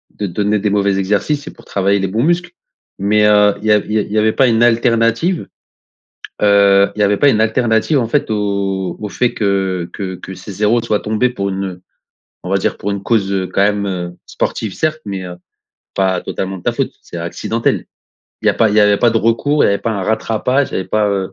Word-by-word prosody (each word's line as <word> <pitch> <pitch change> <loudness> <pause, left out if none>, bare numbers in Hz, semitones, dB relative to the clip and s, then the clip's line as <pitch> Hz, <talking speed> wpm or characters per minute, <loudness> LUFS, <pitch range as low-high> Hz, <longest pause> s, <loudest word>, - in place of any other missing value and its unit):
de 105 - -3
donner 105 +3 0
des 105 +1 0
mauvais 100 -1 +1
exercices 105 +10 -1
et - - -7
pour - - -17
travailler 100 +1 +1
les 95 - -1
bons 110 +6 -1
muscles. 175 +2 0 0.5
Mais, 105 +2 +2
heu, 105 -1 +5
il 110 - -4
y - - +4
a 105 - +6
il 105 - -5
y 110 - +3
a - - +2
il 100 - -7
y 110 - -1
avait 110 0 +3
pas 130 - +3
une 115 +1 +3
alternative? 115 +7 +2 1.0
Heu, 100 -1 +5
il - - -4
y - - +4
avait 100 0 +3
pas 145 - +4
une 110 -5 +3
alternative, 115 +5 +1
en 115 - -2
fait, 140 -3 0
au 100 -3 -1
au 105 - -4
fait 125 -1 0
que 95 -4 -1
que 95 -2 -5
que 95 +1 -9
ces 95 +2 -9
0 105 +4 +2
soient 110 -3 0
tombés 110 +4 0
pour 100 -5 -3
une 95 -2 -5 0.6
on 90 - -5
va 100 - +3
dire - - -1
pour 100 - -4
une 100 -1 -3
cause, 100 -4 +1
heu, 95 -1 -1
quand 100 - +1
même, 100 0 +1
heu, 90 -2 -4
sportive 110 -4 -3
certes, 155 0 -1
mais, 100 -2 -5
heu, 90 -1 -8 0.6
pas 95 -2 +1
totalement 95 0 -4
de - - -14
ta - - 0
faute? - - -2
C'est - - -10
accidentel. 85 +7 -2 0.6
Il - - -2
y - - +6
a - - -3
pas 110 - +3
il 105 - 0
y - - +6
a 105 0 +4
pas 120 - +4
de 115 - 0
recours? 115 +7 +2
Il - - +5
y - - +3
avait 100 - +1
pas 115 +3 -2
un 100 -2 -3
rattrapage? 115 +6 0
il - - -14
y - - 0
avait - - -5
pas, 105 -1 +1
heu 95 -1 -2
105 Hz, 250 wpm, -16 LUFS, 95-115 Hz, 1.0 s, a